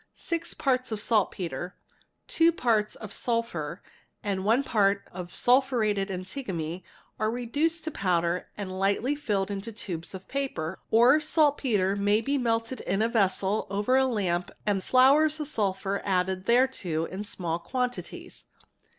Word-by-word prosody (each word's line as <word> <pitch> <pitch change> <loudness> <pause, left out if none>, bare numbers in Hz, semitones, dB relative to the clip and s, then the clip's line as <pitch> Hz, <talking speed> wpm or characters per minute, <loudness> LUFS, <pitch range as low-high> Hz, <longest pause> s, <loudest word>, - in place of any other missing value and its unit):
6 335 -1 -4
parts 255 -3 0
of 215 - -2
saltpetre, 185 -4 -1 0.5
2 330 +1 +3
parts 225 -8 +1
of 215 - -9
Iphur, 215 -10 -2 0.4
and 195 -2 -2
1 230 +7 +3
part 200 -5 +1
of 180 -1 -8
sulphurated 240 -6 +2
antimony 185 - -4 0.4
are 215 - +1
reduced 285 +8 -1
to 315 - -3
powder 175 - 0
and 200 -2 -5
ghtly 200 +9 0
filled 205 -9 -1
into 200 +3 -4
tubes 180 -5 -6
of 190 - -10
paper; 225 - -3
or 245 +6 +6
saltpetre 275 - +2
may 205 +1 +2
be 280 +4 0
melted 230 +1 -1
in 195 +3 0
a - - +3
vessel 200 -2 +1
er 205 +6 +1
a 265 0 +4
lamp 180 -7 -1 0.2
and 200 -3 0
flours 290 +6 +5
of 300 - -2
sulphur 200 -6 -1
added 185 0 0
thereto 235 -10 +2
in 190 +4 -6
small 170 -5 -3
quantities. 250 +8 -4
210 Hz, 140 wpm, -27 LUFS, 190-255 Hz, 0.5 s, or